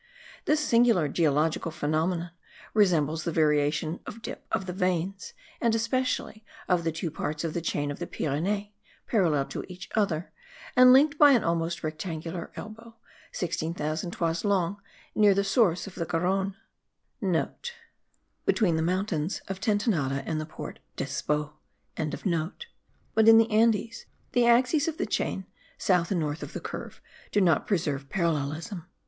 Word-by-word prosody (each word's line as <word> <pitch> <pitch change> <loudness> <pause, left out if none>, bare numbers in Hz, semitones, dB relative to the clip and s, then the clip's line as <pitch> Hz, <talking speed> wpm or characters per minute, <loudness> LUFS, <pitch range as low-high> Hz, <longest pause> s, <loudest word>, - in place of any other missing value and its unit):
This 305 - +3
singular 235 - +4
geological 155 +2 +1
phenomenon 165 +2 -1 0.4
resembles 165 -7 +3
the 170 - -1
variation 155 +1 +1
of 225 +2 -8
dip - - -7
of 190 - 0
the 180 - -4
veins, 185 +1 -1 0.3
and 230 -2 +3
especially 230 -1 -1 0.2
of 180 -2 +2
the 165 - 0
two 165 +1 -4
parts 155 0 -3
of 165 -2 -2
the 170 - -2
chain 145 -3 -1
of 145 - -7
the 175 - -4
Pyrenees, 200 +8 -2 0.3
parallel 165 - +2
to - - -4
each 180 0 -9
other, 185 -6 0 0.4
and 255 0 +8
linked 285 +3 +5
by 290 -2 +8
an 240 - +3
almost 170 0 -1
rectangular 165 +1 -4
elbow, 225 +1 -9 0.4
16,000 160 -1 -2
toises 165 -1 -1
long, 200 -1 0 0.3
near 205 -2 +5
the 200 - +2
source 195 -4 +2
of 195 - -9
the 170 - -3
Garonne;* 190 +3 0 1.0
(* 475 -1 -14
Between 180 -8 +3
the - - +1
mountain 175 -2 0 0.2
of 195 -1 -4
Tentenade 200 - +1
and 155 -1 -2
the 155 - -6
Port 155 - -8 0.2
d'Espot.); 150 0 -2 1.6
but 220 0 +4
in 225 0 +10
the 225 +1 +4
Andes, 225 +1 +2 0.2
the 240 -1 +3
axes 255 +6 +4
of 320 -1 -2
the 370 - -1
chain, 190 - -2 0.3
south 180 -3 +2
and 190 - +1
north 155 +1 -2
of - - -7
the - - -4
curve, - - -7 0.3
do - - +3
not 170 -6 +3
preserve 145 -8 -1
parallelism. 170 +2 -2
180 Hz, 150 wpm, -27 LUFS, 160-215 Hz, 1.6 s, in